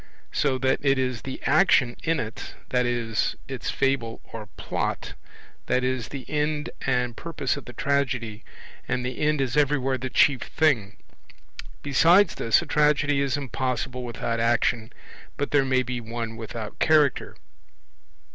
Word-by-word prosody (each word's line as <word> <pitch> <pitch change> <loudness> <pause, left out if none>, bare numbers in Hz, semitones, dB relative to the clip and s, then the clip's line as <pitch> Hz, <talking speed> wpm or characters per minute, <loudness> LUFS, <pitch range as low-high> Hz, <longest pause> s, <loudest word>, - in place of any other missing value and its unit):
So 135 -3 +1
that 130 +1 +1
it 135 -1 +3
is 130 -3 -1
the 130 +1 -6
action 135 -10 +4
in 165 -1 0
it, 110 +1 -6 0.2
i.e. 120 -2 0 0.3
its 130 -3 -4
Fable 135 -4 0
or 110 -2 -9
Plot, - - -3 0.5
that 125 0 +1
is 130 -3 -1
the 135 -3 -8
end 150 0 -1 0.2
and 125 -2 +1
purpose 165 -4 -2
of 145 - -8
the 125 - -10
tragedy; 130 -7 -1 0.4
and 125 0 -1
the 125 0 -4
end 150 0 +2
is 125 -2 -1
everywhere 135 -3 +2
the 130 +1 -4
chief 135 0 +4
thing. 120 -11 +1 0.9
Besides 170 +7 +5
this, 115 +8 +2
a - - -8
tragedy 145 -1 +2
is 140 0 0
impossible 130 -2 -3
without 115 -1 -3
action, 115 0 +1 0.5
but 145 - -2
there 145 -2 +4
may 130 -1 +2
be 125 -1 -4
one 115 0 -5
without 115 -1 -7
Character. 150 -4 +3
130 Hz, 145 wpm, -25 LUFS, 120-145 Hz, 0.9 s, Besides